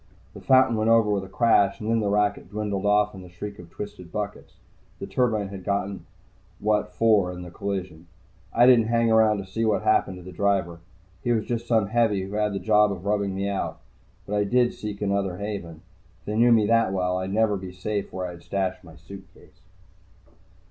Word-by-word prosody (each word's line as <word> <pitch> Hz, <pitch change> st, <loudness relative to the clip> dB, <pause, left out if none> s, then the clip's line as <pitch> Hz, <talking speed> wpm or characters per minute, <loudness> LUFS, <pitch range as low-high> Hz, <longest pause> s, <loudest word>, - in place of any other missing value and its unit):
The -, -, -11 dB
fountain 130 Hz, -3 st, +4 dB
went 110 Hz, +1 st, +1 dB
over 115 Hz, -2 st, +4 dB
with 100 Hz, -2 st, 0 dB
a -, -, -13 dB
crash 100 Hz, 0 st, +3 dB
and 110 Hz, -, -6 dB
then 115 Hz, 0 st, +2 dB
the 105 Hz, -2 st, 0 dB
racket 105 Hz, 0 st, 0 dB
dwindled 105 Hz, -1 st, -2 dB
off 105 Hz, 0 st, +3 dB
in 95 Hz, -, -10 dB
the 90 Hz, -, -12 dB
shriek 100 Hz, +4 st, -8 dB
of 85 Hz, -1 st, -12 dB
twisted 100 Hz, -2 st, -9 dB
buckets. 105 Hz, -1 st, -6 dB, 0.4 s
The -, -, -6 dB
turbine 110 Hz, -6 st, 0 dB
had 95 Hz, -1 st, -8 dB
gotten 100 Hz, 0 st, -3 dB, 0.5 s
what 105 Hz, -2 st, 0 dB
for 100 Hz, -1 st, +3 dB
in 90 Hz, 0 st, -8 dB
the 90 Hz, -, -10 dB
collision. 95 Hz, -4 st, -5 dB, 0.4 s
I 120 Hz, -, +5 dB
didn't 120 Hz, -3 st, +6 dB
hang 115 Hz, 0 st, +2 dB
around 110 Hz, -1 st, +4 dB
to 100 Hz, -, -5 dB
see 105 Hz, +4 st, -3 dB
what 110 Hz, -1 st, +1 dB
had 110 Hz, -, +4 dB
happened 95 Hz, -3 st, +1 dB
to 90 Hz, -, -11 dB
the 90 Hz, -, -9 dB
driver. 95 Hz, -3 st, 0 dB, 0.4 s
He 120 Hz, -, 0 dB
was 110 Hz, -2 st, +1 dB
just 120 Hz, -1 st, -3 dB
some 110 Hz, -3 st, +3 dB
heavy 110 Hz, -4 st, +1 dB
who 95 Hz, +2 st, -8 dB
had 105 Hz, -1 st, 0 dB
the -, -, -2 dB
job 105 Hz, +2 st, +3 dB
of 95 Hz, -1 st, -7 dB
rubbing 100 Hz, -2 st, 0 dB
me 100 Hz, +1 st, -2 dB
out. 100 Hz, -1 st, -3 dB, 0.5 s
But 105 Hz, -, -2 dB
I 105 Hz, -, +2 dB
did 120 Hz, +4 st, +2 dB
seek 105 Hz, -1 st, -6 dB
another 100 Hz, -2 st, -1 dB
haven. 95 Hz, -5 st, -6 dB, 0.4 s
If -, -, -33 dB
they 105 Hz, -, -3 dB
knew 120 Hz, +2 st, +4 dB
me 110 Hz, -2 st, +5 dB
that 115 Hz, -2 st, +3 dB
well, 90 Hz, -1 st, 0 dB
I'd 95 Hz, +1 st, -4 dB
never 110 Hz, 0 st, +2 dB
be 95 Hz, -1 st, -7 dB
safe 100 Hz, +2 st, -4 dB
where 95 Hz, 0 st, -4 dB
I 90 Hz, -, -5 dB
had 85 Hz, -1 st, -12 dB
stashed 95 Hz, 0 st, -3 dB
my 80 Hz, -2 st, -14 dB
suitcase. 85 Hz, +5 st, -15 dB
100 Hz, 215 wpm, -25 LUFS, 95-110 Hz, 0.5 s, didn't